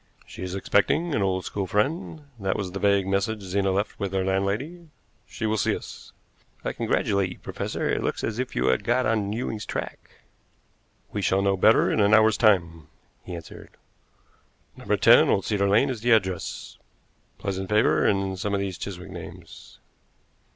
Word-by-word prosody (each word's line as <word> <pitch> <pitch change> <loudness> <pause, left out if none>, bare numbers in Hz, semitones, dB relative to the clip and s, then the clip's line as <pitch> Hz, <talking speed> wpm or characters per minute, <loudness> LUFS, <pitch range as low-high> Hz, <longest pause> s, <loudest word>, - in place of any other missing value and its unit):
She - - -11
is 90 0 -4
expecting 125 - +1
an 105 - +1
old 95 -2 0
school 100 -2 -3
friend 150 - -1 0.2
that 95 -1 -1
was 95 -3 -3
the 100 - -5
vague 100 -1 +3
message 100 +3 -1
Zena 95 +1 0
left 100 +3 -2
with 100 -1 -3
her 95 -1 +1
landlady 105 - -2 0.4
she - - -5
will 110 0 +1
see - - +1
us." - - -10 0.5
"I - - -1
congratulate 100 -2 0
you, 90 - -9
professor; - - -4
it - - 0
looks - - -2
as 110 +1 -2
if 130 - -3
you 65 - +1
had 65 - +1
got 125 +2 +1
on 110 -2 0
Ewing's 110 -1 -3
track." - - -5 1.1
"We 105 - -3
shall 95 +1 +1
know 100 0 +2
better 110 +4 +4
in - - 0
an 105 +1 +5
hour's 110 0 +5
time," 85 - +2 0.4
he 90 - -7
answered. 85 - -11 1.1
"No. - - -13
10 - - +6
Old 95 - +1
Cedar 100 -2 +1
Lane 115 +7 +3
is 120 -4 -6
the 120 +1 +4
address. 95 -5 -2 0.6
Pleasant 95 -1 -4
flavor 105 +1 +3
in 95 -1 0
some 100 +1 -2
of - - 0
these 95 -2 -4
Chiswick 95 -1 -7
names." 85 -3 -11
100 Hz, 180 wpm, -25 LUFS, 95-110 Hz, 1.1 s, 10